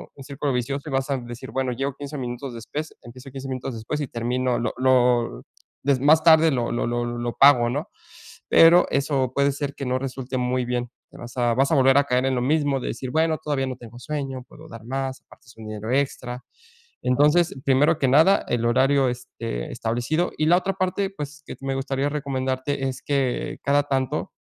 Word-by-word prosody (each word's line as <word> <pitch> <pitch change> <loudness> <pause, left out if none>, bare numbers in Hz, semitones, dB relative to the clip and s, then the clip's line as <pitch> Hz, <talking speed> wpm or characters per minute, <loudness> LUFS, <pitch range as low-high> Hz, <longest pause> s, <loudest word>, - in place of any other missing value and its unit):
un 135 - -11
círculo 140 0 -3
vicioso 135 +4 -3
y - - -7
vas 135 +1 0
a 135 - +1
decir: 120 +1 -8
"Bueno, 130 -1 -1
llego 135 +2 -3
15 145 +1 -7
minutos 125 +1 -5
después, 145 +7 -6
empiezo 130 +3 -12
15 135 0 -7
minutos 130 -1 -4
después 115 +7 -4
y 145 - -2
termino 125 +2 -1
lo 120 - -2
lo 125 - +2 0.4
des 140 -2 +2
más 155 +3 +5
tarde 160 -1 +6
lo 120 -3 -1
lo 120 - -1
lo 120 0 -1
lo 120 0 -3
pago", 125 -4 +6
¿no?, 145 +5 -3 0.6
pero, 170 +2 +7
eso 135 -2 0
puede 140 0 +3
ser 140 0 -4
que 135 - -5
no 130 +1 0
resulte 130 -1 -4
muy 125 0 0
bien. 120 0 -2 0.2
Te - - -14
vas 120 +1 -10
a 120 -1 +2
vas 135 +2 +2
a - - +4
volver 135 0 +5
a 140 - +4
caer 125 -1 +1
en 130 - +1
lo 125 - 0
mismo 145 0 +1
de - - -5
decir: 125 +1 -5
"Bueno, 160 +1 +2
todavía 140 -3 -1
no 130 - -4
tengo 120 0 -12
sueño. 135 -3 -4
Puedo 160 +1 -14
dar 115 -1 -11
más, 135 +1 -3
aparte - - -20
es 115 - -17
un 110 - -10
dinero 110 +1 -5
extra". 125 -2 -2 0.6
Entonces, 150 +7 +3
primero 140 +3 +3
que 135 - +2
nada, 160 +9 +5
el 120 -1 0
horario, 130 +2 +3
este, 115 - -5
establecido 120 +10 -1
y 155 - +1
la 175 - +6
otra 195 +1 -2
parte, 190 +1 -1
pues, 150 -4 -8
que - - -7
t - - -15
me 135 - -1
gustaría 135 +1 -1
recomendarte 135 -1 -2
es, 130 - -5
que 135 -3 -1
cada 145 +1 +2
tanto, 135 -3 -2
135 Hz, 210 wpm, -24 LUFS, 125-145 Hz, 0.6 s, pero